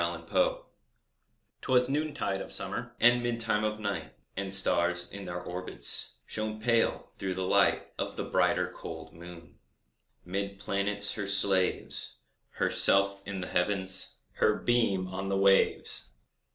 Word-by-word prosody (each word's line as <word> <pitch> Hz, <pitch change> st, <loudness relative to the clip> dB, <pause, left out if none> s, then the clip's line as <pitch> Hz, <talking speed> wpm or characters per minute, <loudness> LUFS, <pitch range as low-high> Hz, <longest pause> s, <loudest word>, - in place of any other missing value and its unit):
EVENING -, -, -4 dB
STAR -, -, 0 dB, 1.0 s
'Twas 125 Hz, -1 st, +2 dB
noontide 145 Hz, -9 st, -2 dB
of -, -, -9 dB
summer, -, -, -1 dB
And 120 Hz, +1 st, +4 dB
midtime 115 Hz, -3 st, 0 dB
of 110 Hz, 0 st, -3 dB
night, 100 Hz, -10 st, -5 dB, 0.2 s
And 95 Hz, 0 st, -4 dB
stars, 90 Hz, -2 st, +4 dB
in 100 Hz, -1 st, -8 dB
their 90 Hz, 0 st, -5 dB
orbits, 90 Hz, +1 st, 0 dB
Shone 110 Hz, 0 st, -5 dB
pale, 115 Hz, +1 st, 0 dB
through 95 Hz, -1 st, -3 dB
the 95 Hz, -, -3 dB
light -, -, +2 dB
Of -, -, -4 dB
the -, -, -4 dB
brighter, -, -, 0 dB
cold -, -, -10 dB
moon. 85 Hz, -1 st, -14 dB, 0.7 s
'Mid 100 Hz, +2 st, -4 dB
planets 100 Hz, +1 st, +2 dB
her 105 Hz, -2 st, -4 dB
slaves, 95 Hz, -2 st, +1 dB, 0.4 s
Herself 100 Hz, 0 st, +3 dB
in 100 Hz, -2 st, -5 dB
the 90 Hz, -, -5 dB
Heavens, 95 Hz, +2 st, -2 dB, 0.2 s
Her 105 Hz, -, +1 dB
beam 105 Hz, -7 st, 0 dB
on 95 Hz, +1 st, -6 dB
the 95 Hz, -, -1 dB
waves. 95 Hz, -9 st, +4 dB
100 Hz, 140 wpm, -28 LUFS, 95-110 Hz, 1.0 s, And